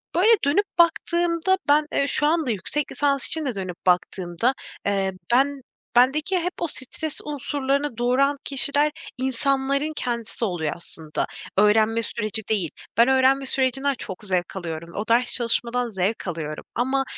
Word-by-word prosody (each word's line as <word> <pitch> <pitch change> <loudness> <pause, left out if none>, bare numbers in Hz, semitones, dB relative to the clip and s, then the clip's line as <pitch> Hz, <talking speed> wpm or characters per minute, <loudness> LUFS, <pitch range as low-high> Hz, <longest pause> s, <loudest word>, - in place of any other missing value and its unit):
böyle, 380 +6 +4 0.2
dönüp 390 +9 +3
baktığımda 340 +2 +2
ben, 300 +1 +5
eee, 280 - +1
şu 295 - +2
anda 315 -6 +1
yüksek 245 +9 -2
lisans 280 -2 +1
için 320 -2 0
de 250 -5 -2
dönüp 185 -2 -5
baktığımda, 180 +5 +1 0.3
eee, 195 -1 0 0.2
ben 275 +2 +2 0.3
bendeki 300 +9 +3
hep 360 +2 -2
o 340 - +1
stres 295 +3 -3
unsurlarını 280 -2 -2
doğuran 270 +4 +2
kişiler 285 +2 +1 0.3
insanların 275 +3 0
kendisi 235 -1 -2
oluyor 165 -6 -2
aslında. 160 -2 -5 0.3
Öğrenme 220 +2 +4
süreci 215 -1 -3
değil. 190 -8 +1 0.3
Ben 235 +2 +6
öğrenme 265 +1 +3
sürecinden 270 +1 +1
çok 190 +2 -7
zevk 185 -2 -1
alıyorum. 170 -2 -5
O 205 - -2
ders 240 +2 +4
çalışmadan 240 0 0
zevk 195 +1 -2
alıyorum 155 -3 -4
ama 265 +3 +1
255 Hz, 145 wpm, -24 LUFS, 205-285 Hz, 0.3 s, Ben